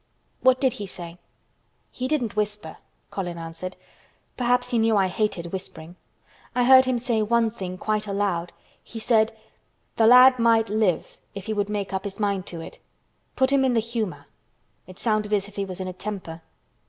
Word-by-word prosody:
"What 255 0 +4
did 260 -3 +2
he 205 - -6
say?" 175 -2 -9 0.7
"He 255 - -4
didn't 255 -8 -1
whisper," 210 -6 -3 0.3
Colin 175 -3 -4
answered. 165 +2 -7 0.6
"Perhaps 245 0 +1
he 235 - +2
knew 220 -1 +3
I 195 - +4
hated 185 -3 -2
whispering. 175 -3 -7 0.6
I 250 - +3
heard 260 +1 +7
him 255 -1 +1
say 235 -2 0
one 230 +1 +2
thing 185 -4 -6
quite 215 +1 -1
aloud. 195 -4 -1 0.3
He 230 - -10
said, 220 -1 +3 0.7
'The 225 - +5
lad 250 +1 +8
might 230 -2 +3
live 205 -5 0 0.2
if 200 -1 -7
he 220 - -2
would 205 -1 -1
make 205 -2 -3
up 190 0 -2
his 200 +1 -6
mind 200 -3 -1
to 170 -2 -6
it. - - -10 0.6
Put 260 0 +2
him 275 -1 +4
in 255 -2 +2
the - - +4
humor.' 225 -4 -4 0.6
It 185 0 -12
sounded 215 -2 0
as 200 -1 -2
if 205 - -16
he 200 - -2
was 185 -1 -7
in 185 - -4
a 185 - -5
temper." 185 -4 -6
210 Hz, 185 wpm, -24 LUFS, 185-235 Hz, 0.7 s, lad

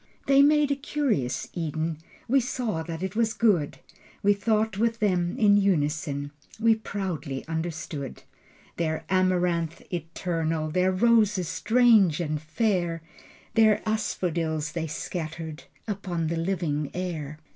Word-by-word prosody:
They 275 0 +6
made 295 0 +4
a - - +3
curious 270 - -1
Eden. 160 -1 -2 0.3
We 270 +3 +4
saw 240 -8 -2
that 165 +1 -5
it 190 +1 -3
was 225 -1 +1
good. 190 -11 +2 0.5
We 205 0 +5
thought 215 0 0
with 230 0 +1
them 180 -5 0
in 205 -2 +5
unison. 150 -6 0 0.3
We 225 0 +5
proudly 190 -10 -4
understood 160 -4 -4 0.5
Their 160 -1 -1
amaranth 180 -3 +1
eternal, 165 -2 -2
Their 185 +2 +2
roses 210 -3 +3
strange 220 -8 +4
and 155 -3 -2
fair, 170 -1 -1 0.5
The 220 -1 +4
asphodels 165 -7 -1
they 160 0 -3
scattered 160 0 -5 0.2
Upon 190 -5 -2
the 170 - -1
living 165 -5 -1
air. 160 -5 -4
175 Hz, 125 wpm, -26 LUFS, 160-215 Hz, 0.5 s, They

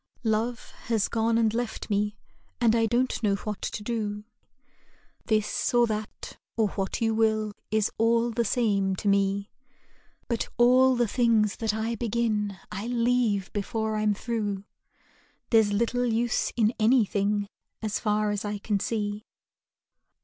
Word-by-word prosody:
Love 225 +2 -1 0.2
has 220 -4 +2
gone 225 0 +1
and 225 -2 +2
left 235 -1 -3
me 210 +1 0 0.4
and 230 -2 +4
I 225 -1 +3
don't 245 +3 0
know 205 -3 +2
what 210 0 -5
to 210 - -4
do; 210 -2 -3 1.0
This 215 +2 0
or 240 0 +6
that 215 -1 -5 0.2
or 220 -2 +2
what 195 +2 -3
you 225 -1 +2
will 220 -1 +1 0.2
is 215 0 +1
all 230 +1 +3
the 235 +1 0
same 200 -4 +1
to 205 - -4
me; 200 0 +1 0.8
But 235 -2 -2
all 255 +2 +5
the 240 -1 +2
things 225 -3 +2
that 225 -2 0
I 220 +1 -1
begin 220 -3 -1
I 210 +2 -4
leave 235 -5 +1
before 220 +2 -2
I'm 215 -1 +1
through, 205 -3 -3 0.9
There's 220 -3 +5
little 235 +4 +1
use 235 +1 0
in 225 -1 +2
anything 210 -3 +2 0.4
as 215 -1 -1
far 210 -1 +1
as 205 -1 -2
I 205 0 -3
can 205 0 -1
see. 210 -1 -2
220 Hz, 145 wpm, -27 LUFS, 205-235 Hz, 1.0 s, or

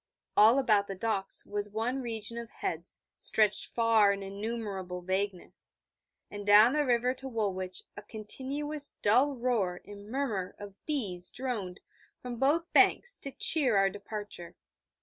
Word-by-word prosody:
All 220 +5 +7
about 215 -7 +3
the 195 - -5
docks 195 -1 -1
was 205 0 -3
one 230 +6 -2
region 230 -1 -4
of 235 -1 -8
heads 170 -2 -4 0.2
stretched 215 -2 +2
far 225 -3 +4
in 200 0 -3
innumerable 195 -3 -5
vagueness, 190 0 -3 0.6
and 205 0 -6
down 210 +4 +7
the 300 0 +2
river 250 -1 +2
to 265 +1 -8
Woolwich 190 -6 -3
a 205 - -7
continuous 275 +8 -4
dull 255 +7 +4
roar 230 -8 0
and 205 0 -11
murmur 220 -8 -2
of 200 -1 -11
bees 195 - -1
droned 220 -8 -4 0.4
from 245 -1 -6
both 305 +7 +1
banks 485 - +4
to 275 - -6
cheer 265 -7 +2
our 195 0 +3
departure. 205 -3 -8
215 Hz, 145 wpm, -30 LUFS, 200-250 Hz, 0.6 s, All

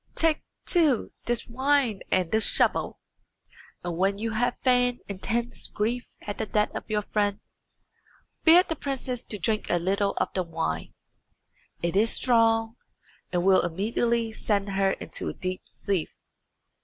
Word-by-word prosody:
take, 325 -1 +2 0.2
too, 310 - +2
this 240 -1 0
wine 260 -3 +1
and 180 -3 +1
this 220 0 +7
shovel, - - +2 0.8
and 175 -1 -3
when 195 +2 +1
you 225 +2 -2
have 240 +3 0
feigned 245 -1 +2
intense 230 +5 -2
grief 235 +4 -2 0.2
at 205 - -6
the 220 - -2
death 210 0 0
of - - -7
your 210 -1 0
friend, 205 -1 -1 1.0
bid 350 +3 +7
the 325 - -2
princess 255 -4 -3
to 210 - -5
drink 215 +4 -1
a 175 - +2
little 200 +3 0
of - - 0
the 185 - 0
wine. 85 - -3 0.9
It 170 +1 -1
is 220 +3 +3
strong, 225 -1 +2 0.5
and 175 0 0
will 190 -1 +5
immediately 225 +6 -1
send 205 -2 0
her 195 0 +1
into - - -3
a - - -7
deep 185 0 -4
sleep. 195 -6 -2
220 Hz, 150 wpm, -26 LUFS, 195-240 Hz, 1.0 s, this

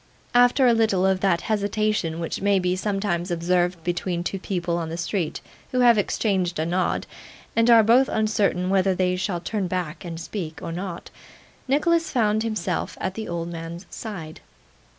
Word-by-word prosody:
After 245 +2 +5
a 240 - +6
little 215 -5 +2
of 190 -1 +2
that 180 -3 +2
hesitation 205 -5 0
which 165 +2 -4
may 200 0 +3
be 180 -1 +1
sometimes 195 -2 -1
observed 175 0 0
between 175 0 -2
two 195 +2 -3
people 175 -3 -2
in 160 - -4
the 165 - -4
street 170 -1 -2 0.3
who 255 - +1
have 240 -1 +7
exchanged 195 -3 0
a 155 - 0
nod, 180 +2 0 0.5
and 230 +1 +3
are 230 -2 +8
both 245 +5 +5
uncertain 205 -4 +1
whether 190 -1 +3
they 180 0 +1
shall 180 -1 -2
turn 200 +1 -2
back 175 -2 -3
and 165 -2 -6
speak, 165 -2 -5
or - - -6
not, 175 0 -6 0.6
Nicholas 330 +5 +2
found 215 -4 +1
himself 205 -6 -2
at 190 - -2
the 220 +2 -5
old 170 0 -3
man's 170 +1 -7
side. 170 -8 -7
185 Hz, 170 wpm, -24 LUFS, 175-215 Hz, 0.6 s, are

